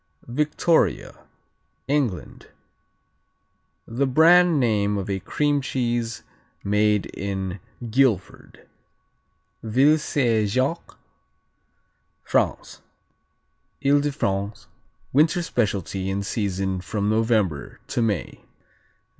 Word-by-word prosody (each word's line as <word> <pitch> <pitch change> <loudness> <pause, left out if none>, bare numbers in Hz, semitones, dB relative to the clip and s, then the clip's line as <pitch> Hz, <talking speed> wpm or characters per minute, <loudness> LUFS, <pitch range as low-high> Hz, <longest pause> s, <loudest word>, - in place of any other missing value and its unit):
Victoria 150 +3 0 0.6
England 135 - -2 1.4
The 135 +4 -1
brand 165 +4 +5
name 105 -4 +1
of 100 0 -3
a 95 - -1
cream 145 +8 0
cheese 120 -3 -2 0.4
made 105 0 +2
in 95 -1 -4 0.3
Guilford. 115 -5 -1 0.9
Ville 135 +8 +3
Saint 115 -8 +1
Jacques 130 +9 -2 1.3
France - - -1 1.0
Ile 145 +1 +5
de 145 0 -1
France 100 -6 -3 0.5
winter 155 +5 +3
specialty 100 - -2
in 100 +1 -2
season 95 -3 -2
from 100 +2 -2
November 110 -8 0
to - - -2
May. 105 -7 -2
115 Hz, 85 wpm, -23 LUFS, 100-140 Hz, 1.4 s, brand